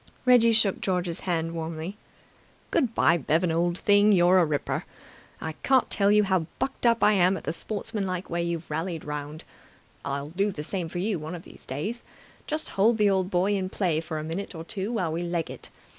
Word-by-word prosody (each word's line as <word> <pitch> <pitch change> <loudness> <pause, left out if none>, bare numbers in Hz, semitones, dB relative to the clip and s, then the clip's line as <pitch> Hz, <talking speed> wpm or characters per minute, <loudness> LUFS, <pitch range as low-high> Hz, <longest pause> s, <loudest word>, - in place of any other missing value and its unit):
Reggie 245 -2 +6
shook 220 -3 +2
George's 180 -2 -1
hand 165 -2 -1
warmly. 165 +3 -5 0.8
"Good 235 -4 +1
bye, 170 - +4
Bevan 165 +4 +1
old 170 +2 +1
thing, 205 +1 +4
you're 185 -1 +5
a 175 - +4
ripper. 150 -2 -2 0.6
I 160 - -4
can't 265 -2 +3
tell 200 0 +3
you 210 0 +5
how 185 -5 +1
bucked 265 -2 -1
up 230 -1 +3
I 210 - +6
am 190 -1 +3
at - - -9
the 160 - -2
sportsmanlike 195 -1 -4
way 170 0 -2
you've 170 -2 -3
rallied 165 +1 -3
round. 150 +1 -5 0.6
I'll 140 +1 -3
do 195 +5 0
the 150 -5 -6
same 175 0 -3
for 175 - -6
you 195 0 -1
one 155 +3 -6
of 170 - -9
these - - -14
days. 185 - -4 0.5
Just 310 +1 -3
hold 220 +4 +3
the 210 -2 +4
old 190 -1 +1
boy 185 +2 +2
in 190 -2 -1
play 175 -6 0
for 160 -1 -5
a 155 - -3
minute 170 +4 -5
or 160 - -6
two 200 +3 -4
while 180 -8 -1
we 165 - -2
leg 170 -2 -2
it. - - -11
180 Hz, 205 wpm, -26 LUFS, 165-205 Hz, 0.8 s, Reggie